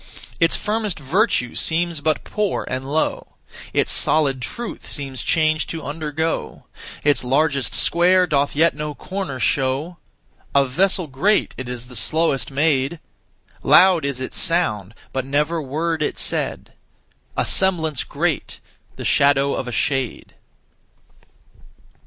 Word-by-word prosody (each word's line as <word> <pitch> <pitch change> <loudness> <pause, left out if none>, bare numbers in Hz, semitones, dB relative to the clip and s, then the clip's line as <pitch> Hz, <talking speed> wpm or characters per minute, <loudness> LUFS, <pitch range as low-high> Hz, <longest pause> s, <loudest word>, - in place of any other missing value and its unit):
Its 165 0 +4
firmest 210 -2 -2
virtue 150 - +1
seems 165 -1 0
but 155 0 0
poor 210 -2 -2
and 130 +2 -4
low; 155 +1 -1 0.4
Its - - +1
solid 140 -4 +2
truth 235 - -6
seems 135 -3 -3
change 155 -1 +1
to 165 -1 -5
undergo; 155 +2 -3 0.4
Its 145 -2 +2
largest 140 +1 +1
square 180 +2 +4
doth 145 -4 0
yet 160 +1 +3
no 150 0 -5
corner 185 -9 -5
show 135 +8 0 0.6
A 140 0 +5
vessel 180 +7 +1
great, 160 +10 +1
it 130 -1 -7
is 125 -1 -5
the 125 0 -10
slowest 160 0 +2
made; 140 +1 +1 0.6
Loud 185 -4 +5
is 140 -2 -2
its 130 - -5
sound, 110 - 0 0.2
but 130 - -1
never 150 +5 0
word 155 +3 -2
it 150 - -1
said; - - -1 0.6
A - - +1
semblance 160 -7 +2
great, - - -2 0.4
the - - -7
shadow 140 0 +3
of 125 - -3
a - - -4
shade.' 130 +1 -2
150 Hz, 130 wpm, -21 LUFS, 135-170 Hz, 0.6 s, A